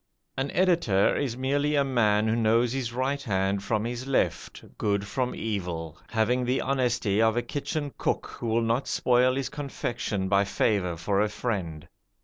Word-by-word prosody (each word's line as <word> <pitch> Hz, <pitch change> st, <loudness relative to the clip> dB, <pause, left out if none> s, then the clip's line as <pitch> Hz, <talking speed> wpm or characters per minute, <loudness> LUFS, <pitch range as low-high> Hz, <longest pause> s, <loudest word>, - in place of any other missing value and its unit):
An 135 Hz, +1 st, -2 dB
editor 170 Hz, -, +2 dB
is 125 Hz, -5 st, -2 dB
merely 145 Hz, +3 st, +1 dB
a 140 Hz, -, +4 dB
man 110 Hz, -5 st, +2 dB
who 110 Hz, -, +2 dB
knows 115 Hz, +1 st, +2 dB
his 130 Hz, -3 st, -2 dB
right 130 Hz, +3 st, -1 dB
hand 95 Hz, -5 st, 0 dB
from 110 Hz, +2 st, -1 dB
his 120 Hz, +2 st, -4 dB
left, 135 Hz, -, -1 dB, 0.2 s
good 100 Hz, -1 st, 0 dB
from 125 Hz, +5 st, -2 dB
evil, 90 Hz, -6 st, -4 dB
having 115 Hz, +3 st, +1 dB
the 125 Hz, +2 st, +1 dB
honesty 120 Hz, -6 st, +1 dB
of 110 Hz, +1 st, +3 dB
a 120 Hz, -, +1 dB
kitchen 145 Hz, -1 st, -3 dB
cook -, -, 0 dB
who 120 Hz, -, -7 dB
will 115 Hz, +1 st, +2 dB
not 115 Hz, +4 st, 0 dB
spoil 125 Hz, +1 st, +3 dB
his 135 Hz, -1 st, -2 dB
confection 120 Hz, -8 st, -3 dB
by 100 Hz, +1 st, +3 dB
favour 100 Hz, -3 st, 0 dB
for 100 Hz, +4 st, 0 dB
a 105 Hz, -, +1 dB
friend. 95 Hz, -9 st, -4 dB
115 Hz, 170 wpm, -27 LUFS, 100-130 Hz, 0.2 s, a